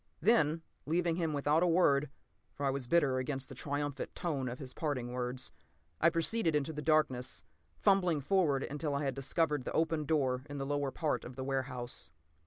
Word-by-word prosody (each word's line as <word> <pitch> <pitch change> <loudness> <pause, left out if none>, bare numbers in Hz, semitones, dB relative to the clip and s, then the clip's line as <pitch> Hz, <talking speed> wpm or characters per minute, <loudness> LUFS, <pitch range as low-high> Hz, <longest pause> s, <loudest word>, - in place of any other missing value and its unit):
Then, 165 -7 +3 0.2
leaving 170 +1 +1
him 165 -3 0
without 145 +2 +2
a 180 - +4
word, 150 -5 +4 0.5
for 145 - -3
I 135 - +3
was 135 -2 -3
bitter 140 -3 +3
against 135 0 -3
the - - -7
triumphant 145 -1 -3
tone 145 -8 -2
of 125 - -5
his 130 -3 -8
parting 130 -6 -2
words, 125 +1 -2 0.5
I 170 - +6
proceeded 165 +1 +1
into 150 +2 0
the 150 - -4
darkness, 135 -4 +1 0.3
fumbling 180 -6 +3
forward 145 -3 +2
until 145 0 -2
I 140 - -1
had 135 -2 0
discovered 145 +1 0
the - - -4
open 160 -1 +1
door 135 -4 +1
in 145 - -5
the 135 - -2
lower 145 0 0
part 155 +2 -1
of 125 - -9
the 130 - -4
warehouse. 130 -2 -2
145 Hz, 190 wpm, -33 LUFS, 135-160 Hz, 0.5 s, I